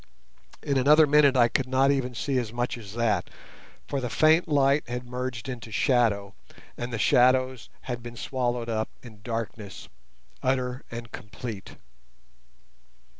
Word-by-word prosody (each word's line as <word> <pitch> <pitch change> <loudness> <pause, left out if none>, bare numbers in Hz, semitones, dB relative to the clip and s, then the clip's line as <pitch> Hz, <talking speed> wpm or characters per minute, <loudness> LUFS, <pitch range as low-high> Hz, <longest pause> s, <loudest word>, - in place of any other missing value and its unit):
In 140 -2 +1
another 150 +4 +6
minute 145 -2 +4
I 120 -1 +6
could 130 +2 -1
not 135 +2 +3
even 130 -3 -1
see 135 +2 0
as 115 -3 -4
much 120 +1 -2
as 105 -4 -10
that, 110 -6 0 0.6
for 140 - -2
the 125 - -3
faint 155 +7 +4
light 140 -2 +2
had 125 0 -4
merged 125 0 -5
into 120 -4 -7
shadow, 110 -5 +1 0.4
and 120 +1 -5
the 115 - -2
shadows 130 +2 +3
had 120 -2 -5
been 120 0 -9
swallowed 120 -1 -2
up 110 -1 -2
in 110 -4 -13
darkness, 110 -2 -6 0.5
utter 130 -1 -1
and 115 0 -8
complete. 105 -1 -8
125 Hz, 145 wpm, -26 LUFS, 115-130 Hz, 0.6 s, another